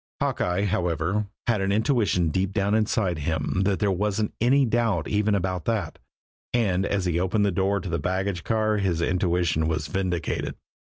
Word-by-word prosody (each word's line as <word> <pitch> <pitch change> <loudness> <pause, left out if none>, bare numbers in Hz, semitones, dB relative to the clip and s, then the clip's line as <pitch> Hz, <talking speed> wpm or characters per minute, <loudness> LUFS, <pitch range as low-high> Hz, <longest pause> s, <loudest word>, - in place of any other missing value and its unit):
Hawkeye, 90 +2 0
however, 90 +2 0 0.2
had 115 -4 +1
an 95 0 0
intuition 105 - +2
deep 95 +4 -1
down 100 0 +1
inside 105 -5 +1
of - - -5
him 80 +3 -1
that 100 -1 +2
there 105 -2 +1
wasn't 105 +3 -1
any 135 +3 +4
doubt 115 -7 0
even 105 0 +1
about 95 -2 -2
that, 105 -8 -2 0.6
and 100 -5 +1
as 95 -2 -1
he 85 -1 +1
opened 100 +3 +1
the 100 - +2
door 95 +2 +1
of 90 -2 -5
the 85 - 0
baggage 95 +2 -2
car 110 -1 +1
his 95 -5 0
intuition 85 -3 +1
was 80 -1 -1
vindicated. 90 0 -2
95 Hz, 175 wpm, -25 LUFS, 85-105 Hz, 0.6 s, any